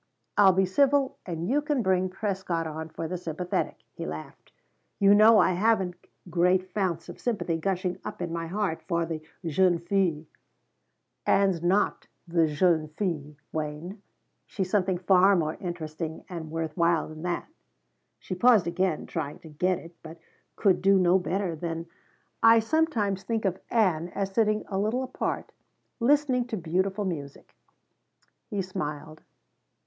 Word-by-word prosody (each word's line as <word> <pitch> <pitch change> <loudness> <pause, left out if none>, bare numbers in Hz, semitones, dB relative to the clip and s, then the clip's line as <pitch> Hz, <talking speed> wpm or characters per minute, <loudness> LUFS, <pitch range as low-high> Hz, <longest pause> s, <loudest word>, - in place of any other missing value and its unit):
"I'll 195 -2 +7
be 190 +1 +2
civil 275 +7 +2
and 170 -1 -3
you 285 +5 +2
can 295 -4 0
bring 185 -1 +2
Prescott 185 -4 -2
on 160 0 -5
for 160 +1 -5
the 180 +1 -4
sympathetic," 170 +1 -3
he - - -6
laughed. 80 +1 -8 0.5
"You 200 0 +6
know 215 +2 +7
I - - +5
haven't 190 -1 +2 0.3
great 180 +1 +3
founts 180 -5 -1
of - - -10
sympathy 210 -8 -1
gushing 185 +1 -2
up - - -6
in 175 -2 -3
my 165 -1 -3
heart 190 -2 -2
for 170 -2 0
the 160 -1 -4 0.2
jeune 175 +2 +3
fille." 170 -3 0 1.0
"Ann's 195 -4 +3
not 185 +4 +1 0.2
the 165 -1 +3
jeune 155 +1 +2
fille, 155 -3 -3 0.2
Wayne. 155 +6 -5 0.5
She's 190 -2 -3
something 190 -3 +2
far 190 +2 +5
more 155 -3 0
interesting 160 -3 -5
and 165 -4 -6
worth 160 -1 -3
while 170 -2 +2
than 155 0 -10
that." 175 0 -2 0.7
She - - -6
paused, 215 0 +5
again 170 -1 -1
trying 145 - -4
to 160 - -12
get 180 +4 0
it, 165 +1 -12
but 160 +1 -10 0.4
could 195 -4 +2
do 195 +1 +5
no 185 0 +4
better 185 -1 -2
than: 165 0 -4 0.6
"I 225 0 +7
sometimes 225 - +1
think 225 -1 -2
of 190 -1 0
Ann 180 -7 +2
as 195 -1 -2
sitting 215 0 +2
a 195 -1 -2
little 220 +6 0
apart, 255 - -3 0.5
listening 260 -1 +3
to 225 - -3
beautiful 190 +4 -1
music." 145 -6 -6 1.0
He 205 -4 -2
smiled. 155 -4 -5
180 Hz, 155 wpm, -27 LUFS, 165-200 Hz, 1.0 s, I'll